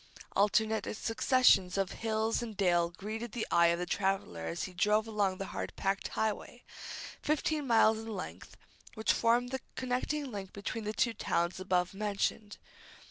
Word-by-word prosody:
Alternate 215 +1 +2
successions 225 -6 +3
of 195 -1 0
hill 220 0 -1
and 225 -4 -6
dale 175 -3 +3
greeted 215 +6 -6
the 235 - -2
eye 170 0 +6
of 170 0 +2
the 180 - -2
traveller 190 - -1
as 80 - -3
he 185 - -5
drove 210 +4 +2
along 205 -4 0
the 195 - -4
hard - - -4
packed 195 0 -1
highway, 220 +3 -2 0.6
fifteen 305 -1 0
miles 225 -2 +5
in 225 - -8
length, 205 -5 -7 0.4
which 220 0 +2
formed 240 +2 +2
the 265 - -2 0.2
connecting 260 +3 -2
link 195 -3 -6
between 215 +2 -4
the 210 - -1
two 235 +1 +1
towns 175 -4 -1
above 185 -1 0
mentioned. 205 +1 -2
210 Hz, 160 wpm, -32 LUFS, 190-225 Hz, 0.6 s, eye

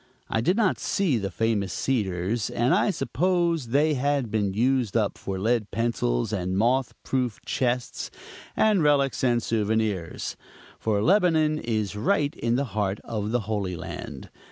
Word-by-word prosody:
I 115 - +1
did 180 - +2
not 215 -5 +2
see 170 - +1
the 100 -1 -3
famous 105 -1 0
cedars, 100 -1 -1
and 120 +2 +1
I - - +3
supposed 170 - 0
they 150 +5 +3
had 140 -3 0
been 105 -3 +1
used 120 +1 +1
up 105 -3 0
for 95 -1 -5
lead 110 +2 0
pencils, 110 - -1
and 95 +1 -1
moth 125 +3 +1
proof 125 -4 -1
chests, 125 -1 -1 0.5
and 215 -4 +4
relics, 140 -3 +2
and 120 -2 +2
souvenirs; 110 -5 -1 0.4
for 105 -2 0
Lebanon 160 -4 +3
is 110 -5 -2
right 145 - +1
in 115 0 -1
the 140 +3 +1
heart 105 -2 -1
of 105 -2 -3
the 120 +1 +1
holy 100 -4 -2
land. 75 -4 -7
115 Hz, 155 wpm, -26 LUFS, 105-140 Hz, 0.5 s, and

